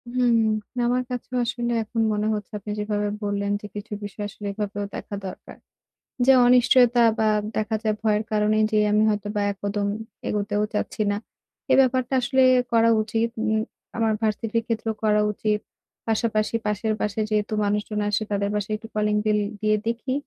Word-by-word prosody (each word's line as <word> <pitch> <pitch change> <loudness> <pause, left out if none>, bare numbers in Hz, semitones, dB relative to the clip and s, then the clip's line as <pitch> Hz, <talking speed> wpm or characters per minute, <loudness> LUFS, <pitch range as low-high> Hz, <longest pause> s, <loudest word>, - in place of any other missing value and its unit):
হুম। 245 -2 +3 0.4
না - - +1
আমার 250 +1 +1
কাছেও 250 +1 -5
আসলে 240 0 -2
এখন 225 +1 -2
মনে 210 0 0
হচ্ছে 210 -2 -5
আপনি 210 +1 -6
যেভাবে 210 0 -1 0.2
বললেন 200 0 -1
যে - - -9
কিছু 210 +1 -6
বিষয় 205 +1 -5
আসলে 205 0 -8
এভাবেও 205 0 -3
দেখা 205 - -6
দরকার। 185 - -10 0.7
যে 265 - +7
অনিশ্চয়তা 245 0 +5 0.2
বা 220 - +3 0.3
দেখা 215 +1 0
যায় 215 -1 +1
ভয়ের 215 -1 +2
কারণেই 215 0 +2
যে 215 - +2
আমি 210 +1 +4
হয়তোবা 210 0 -1
এক 200 - -9
কদম 205 0 -1 0.4
এগোতেও 205 0 0
চাচ্ছি 210 - -2
না। 205 - -1 0.5
এ - - +7
ব্যাপারটা 255 0 +1
আসলে 265 +2 +2 0.3
করা 230 0 +4
উচিত। 225 +2 -1
উম 220 -1 +1 0.4
আমার 225 -1 +2
ভার্সিটির 225 +1 0
ক্ষেত্রেও 225 -1 -2
করা 210 -1 +3
উচিত। 210 0 -1 0.5
পাশাপাশি 220 -1 0
পাশের 210 +1 0
বাসায় 210 +1 -1
যেহেতু 215 0 0
মানুষজন 210 +1 -1
আসে, 210 +1 0
তাদের 200 0 0
বাসায় 210 +1 -1
একটু 225 +1 -11
কলিং 210 0 +1
বেল 210 -1 +3 0.2
দিয়ে 215 0 +3
দেখি 235 +3 -2
215 Hz, 170 wpm, -24 LUFS, 210-230 Hz, 0.7 s, যে